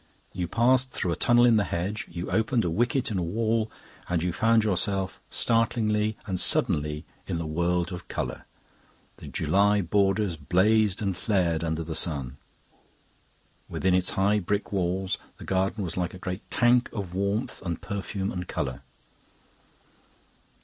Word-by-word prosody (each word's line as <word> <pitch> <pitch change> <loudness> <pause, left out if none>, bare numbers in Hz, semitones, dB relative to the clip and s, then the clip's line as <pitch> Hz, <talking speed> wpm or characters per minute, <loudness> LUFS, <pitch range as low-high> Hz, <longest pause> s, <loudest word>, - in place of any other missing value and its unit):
You 90 -2 -2
passed 125 +6 +3
through 90 -7 -2
a - - 0
tunnel 120 +6 +4
in 115 -2 +5
the 105 - +3
hedge, 95 +4 -3
you 85 +1 -5
opened 110 0 +1
a 85 - 0
wicket 120 +5 +1
in 95 - 0
a - - -1
wall, 110 +5 0 0.4
and 85 -2 0
you 90 -1 0
found 115 +3 +3
yourself, 95 -1 -1
startlingly 110 -2 +1
and 95 -4 -2
suddenly, 75 0 +1 0.2
in - - -2
the 85 - -3
world 85 +3 0
of 90 - -7
colour. - - -4 0.7
The - - -10
July 100 +1 +2
borders 95 0 +1
blazed 100 +6 +2
and 100 -2 0
flared 85 -5 0
under 80 0 -1
the 80 0 -5
sun. 70 -5 -1 1.3
Within 95 -1 +1
its 90 0 +3
high 100 +2 +3
brick 100 +3 -2
walls 95 0 -1 0.2
the - - -10
garden 95 +2 0
was 85 - -3
like 90 0 -2
a - - -8
great 90 +2 -5
tank 120 0 +3
of 100 -5 -5
warmth 100 +5 -1
and 85 -3 -3
perfume 100 0 -3
and 90 -1 -5
colour. 65 -1 -3
95 Hz, 155 wpm, -27 LUFS, 85-110 Hz, 1.3 s, in